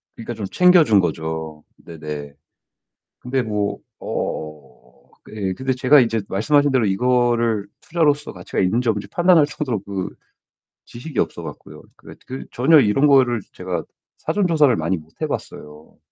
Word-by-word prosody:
그러니까 115 +1 -6
좀 105 -3 -5
챙겨준 175 - +5
거죠. 80 -3 -3
네네. 75 -3 -8 0.9
근데 130 +1 -1
뭐 105 -3 -2 0.2
어. 75 -3 -5 0.5
그 - - -14
예, 95 -3 -1
근데 130 +7 -3
제가 130 +3 +5
인제 115 -2 0
말씀하신 145 +9 +2
대로 130 -4 +2
이거를 120 0 +1 0.2
투자로서 150 -3 0
가치가 90 -2 -5
있는지 115 +6 +1
없는지 105 -2 -2
판단할 175 - +4
정도로 145 -6 -3
그 95 -2 -4 0.7
지식이 125 +2 -10
없어 - - -2
갖고요 - - -10
그래 - - -14
그 130 +1 -6
전혀 140 +6 +4
이런 135 +4 +3
거를 130 -4 +4
제가 90 -3 -4 0.3
사전 205 -3 0
조사를 150 -7 +4
많이 85 +1 -1
못 80 0 -14
해봤어요. 75 +1 -6
115 Hz, 315 characters per minute, -21 LUFS, 90-135 Hz, 0.9 s, 챙겨준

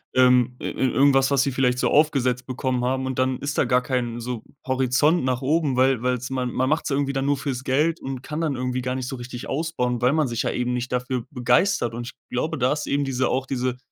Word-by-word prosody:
ähm, 125 -1 +4
ir - - -4
irgendwas, 135 +1 +3
was 140 -2 +3
sie 140 - -1
vielleicht 125 -1 +1
so - - +1
aufgesetzt 130 -5 +2
bekommen 130 -1 -1
haben 130 +1 0
und 130 -1 -3
dann 130 0 +1
ist 145 +1 -3
da - - +3
gar 125 0 +2
kein 120 -3 -2
so 120 -1 -4 0.2
Horizont 135 +5 +2
nach 130 0 -1
oben, 150 -1 +1
weil 130 -2 +3
weil's 125 0 -1
man 125 -2 -1
man 130 +2 0
macht's 155 +2 0
irgendwie 140 0 0
dann 135 0 -1
nur 145 -1 +2
fürs 130 -3 -4
Geld 150 +6 +1
und 130 -1 -5
kann 150 +4 -4
dann 155 -4 0
irgendwie 125 0 -2
gar 125 +1 -2
nicht 130 -1 -4
so 135 - -4
richtig 120 0 -7
ausbauen, 135 -5 -1
weil 125 +2 +3
man 155 -3 +2
sich 115 -1 -2
ja - - -1
eben 125 0 -1
nicht 125 0 -3
dafür 125 -1 -2
begeistert. 125 - +1
Und 120 +1 -5
ich - - -8 0.2
glaube, 125 +6 -1
da 130 +1 +2
ist 150 - -4
eben 140 0 0
diese 130 -1 0
auch 130 +1 0
diese 130 -2 -2
130 Hz, 240 wpm, -23 LUFS, 125-135 Hz, 0.2 s, ähm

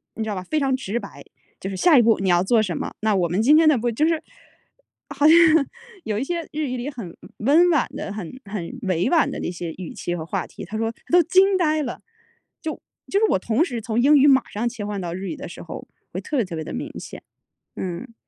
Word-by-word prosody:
你 220 - -3
知 220 - -4
道 210 - -1
吧， 185 - -4
非 310 +10 -1
常 270 -2 +1
直 235 -3 -3
白， - - -11 0.4
就 195 - -5
是 195 - -5
下 315 - +5
一 - - +7
步 225 0 +4
你 190 -1 0
要 175 0 +4
做 220 +3 +3
什 180 -5 -3
么， - - -5
那 215 -1 +2
我 180 -3 +2
们 180 +5 +1
今 290 +6 +6
天 320 0 +5
呢 295 - +4
不 240 +1 -1
就 300 +8 +1
是 325 -1 0 0.9
好 285 +1 0
像 320 - +8 0.7
有 215 -6 -2
一 255 - -1
些 340 +3 -2
日 305 0 -2
语 255 - -3
里 245 +4 -4
很 230 - -8 0.2
温 310 +10 +4
婉 295 -6 +2
的， 195 - -5
很 210 +4 -7
很 195 +3 -6
委 185 -2 0
婉 335 -3 +3
的 - - -5
那 - - -3
些 175 -2 -5
语 180 -2 -7
气 175 - -4
和 160 -2 -5
话 185 +2 -3
题， - - -10
他 210 +5 -5
说： 225 0 0
“啊 - - -7 0.2
都 355 0 +7
惊 380 +3 +4
呆 310 -3 +1
了。” 245 - -6 0.6
就 315 - -3 0.4
就 395 - +1
是 445 - +4
我 - - +2
同 230 - +1
时 245 -9 -4
从 225 +1 0
英 290 +4 +6
语 280 +1 +6
马 265 -2 +5
上 220 +4 -2
切 225 -4 -6
换 205 -1 -3
到 170 -2 -4
日 190 +2 -5
语 - - -4
的 280 - -7
时 - - -10
候， - - -8 0.3
会 - - -3
特 300 - -5
别 245 - +3
特 175 - -7
别 160 - -4
的 155 - -7
明 - - -5
显。 - - -10 0.5
嗯。 190 +7 -5
230 Hz, 280 characters per minute, -23 LUFS, 190-295 Hz, 0.9 s, 像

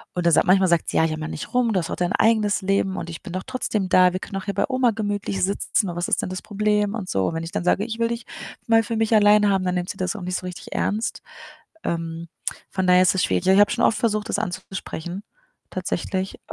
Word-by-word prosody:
und 180 - -1
dann 170 - +4
sagt - - +5
manchmal 190 0 +5
sagt 170 -1 +2
sie: - - -1
„Ja, - - +4
jammer 155 0 -3
nicht - - -6
rum, 235 -3 +2
du 185 - +2
hast 170 - -4
doch - - -2
dein 175 0 -1
eigenes 215 -2 +2
Leben 195 0 0
und 170 - -5
ich 165 - -8
bin 180 - -8
doch 185 - -2
trotzdem 220 -7 -2
da. 180 -1 +5
Wir 185 - -2
können 195 - -6
auch 195 - -6
hier 200 - -2
bei 200 - +2
Oma 255 -3 +2
gemütlich 205 -2 -2
sitzen 200 0 0
und 170 - -5
was 175 +1 -2
ist - - +2
denn - - -4
das 185 0 -5
Problem?“, 210 0 0
und 195 -5 -5
so, 95 -1 +1
und - - -2
wenn 165 - -3
ich 165 - -6
dann 195 - -2
sage: 195 +4 +2
„Ich 225 -1 -5
will 230 0 +2
dich 235 -1 -4 0.4
mal 225 0 +5
für 225 +1 -3
mich 225 0 +2
allein 210 0 +5
haben”, 190 -1 +1
dann 180 - 0
nimmt 180 0 -2
sie - - -5
das 185 +3 -2
auch 215 - -6
nicht 180 0 -2
so 185 - -7
richtig 180 - -9
ernst. 215 +3 -1 0.6
Ähm, 165 0 -3 0.4
von 190 -1 -1
daher 180 0 +6
ist 185 - +3
es 185 - +1
schwierig. - - 0
Ja, 190 - +5
ich - - +5
habe 205 - +4
schon 235 - 0
oft 220 - +2
versucht, 215 -1 0
das - - 0
anzusprechen 185 -1 -5 0.5
tatsächlich. 185 +1 -3
195 Hz, 270 wpm, -23 LUFS, 180-210 Hz, 0.6 s, daher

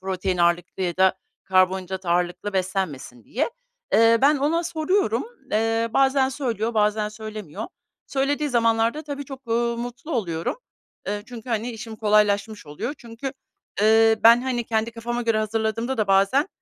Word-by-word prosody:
protein 185 -1 -2
ağırlıklı 175 +2 +1
ya 175 -2 -1
da 190 0 +4 0.3
karbonhidrat 185 0 +1
ağırlıklı 175 +4 0
beslenmesin 185 - -3
diye. 285 - -1 0.4
Eee, 230 0 +5
ben 290 +2 +5
ona 305 +5 +1
soruyorum. 320 - 0 0.3
Eee, 225 +1 +1
bazen 270 0 +3
söylüyor, 235 -5 -2
bazen 210 0 +2
söylemiyor. 215 -3 -7 0.4
Söylediği 285 +2 0
zamanlarda 230 +2 +2
tabii 285 -2 -6
çok, 270 -1 -10
uuu, 235 +1 0
mutlu 245 +7 -7
oluyorum. 170 - -2 0.5
Eee, 205 +1 -2
çünkü, 245 -1 -10
hani, 230 +1 -1
işim 225 -1 -8
kolaylaşmış 210 -2 +1
oluyor. 150 - -5
Çünkü, 235 +3 -7 0.5
eee, 220 +1 +5
ben, 235 +2 +7
hani, 250 -2 -1
kendi 225 0 -1
kafama 235 +1 -4
göre 230 -2 +1
hazırladığımda 220 +3 -1
da 215 - 0
bazen, 195 - +3
225 Hz, 145 wpm, -24 LUFS, 195-245 Hz, 0.5 s, ben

